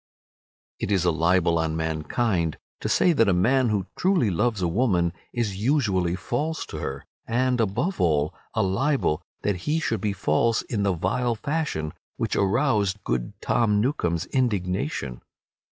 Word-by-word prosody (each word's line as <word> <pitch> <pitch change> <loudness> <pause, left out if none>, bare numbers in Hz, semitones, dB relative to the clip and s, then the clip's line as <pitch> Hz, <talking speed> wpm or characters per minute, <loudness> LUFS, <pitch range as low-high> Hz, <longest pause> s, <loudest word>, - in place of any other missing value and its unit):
It - - -2
is 95 -3 +2
a 85 - +4
libel 85 +1 +2
on 80 -1 -1
mankind 80 +3 -1 0.2
to - - -3
say 175 - +4
that 115 -8 +3
a - - +4
man 125 +7 +3
who 100 -3 0
truly 175 - +2
loves 105 +2 0
a - - +3
woman 90 -3 +1 0.2
is 110 -6 -2
usually 100 - +1
false 145 - -2
to - - -3
her, 70 +1 -5 0.2
and, 125 +1 +1
above 120 - -1
all, 75 -4 +2 0.2
a - - +2
libel 100 - +1 0.2
that 105 -3 +1
he 155 +2 +2
should 115 -10 -1
be 105 - 0
false 115 +3 +1
in 110 -4 -2
the 100 -1 +2
vile 115 +8 0
fashion 110 - -2 0.2
which - - -1
aroused 105 -2 +1
good - - -3
Tom 105 -4 +2
Newcome's 90 - 0
indignation. 100 - -1
100 Hz, 155 wpm, -25 LUFS, 85-125 Hz, 0.2 s, a